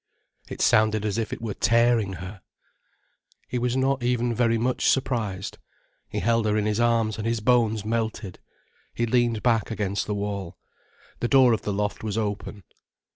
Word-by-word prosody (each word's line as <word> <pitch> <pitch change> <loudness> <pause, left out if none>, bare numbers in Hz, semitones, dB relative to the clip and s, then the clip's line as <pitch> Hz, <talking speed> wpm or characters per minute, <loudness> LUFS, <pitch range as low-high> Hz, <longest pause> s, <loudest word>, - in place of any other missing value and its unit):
It - - -6
sounded 110 -1 +3
as 105 +1 -1
if 110 -2 -3
it - - -6
were 110 -3 -3
tearing 115 -3 +2
her. 95 +3 -8 1.1
He 125 - -2
was 125 +1 0
not 135 0 +1
even 120 0 0
very 115 0 +2
much 125 +3 +1
surprised. 110 -8 -1 0.5
He - - -3
held 115 +2 +2
her 105 0 +1
in 105 - 0
his 105 +1 0
arms, 115 -2 +1
and 110 - -2
his 115 0 0
bones 110 -2 +2
melted. 110 -4 -3 0.6
He 120 - 0
leaned 120 -2 +1
back 115 -3 +2
against 105 -3 -2
the 105 - -1
wall. 100 -3 -4 0.6
The 120 - 0
door 130 -2 +5
of 110 - -1
the 105 - -3
loft 105 +2 -2
was 110 -1 -3
open. 105 -2 -4
110 Hz, 175 wpm, -25 LUFS, 105-120 Hz, 1.1 s, door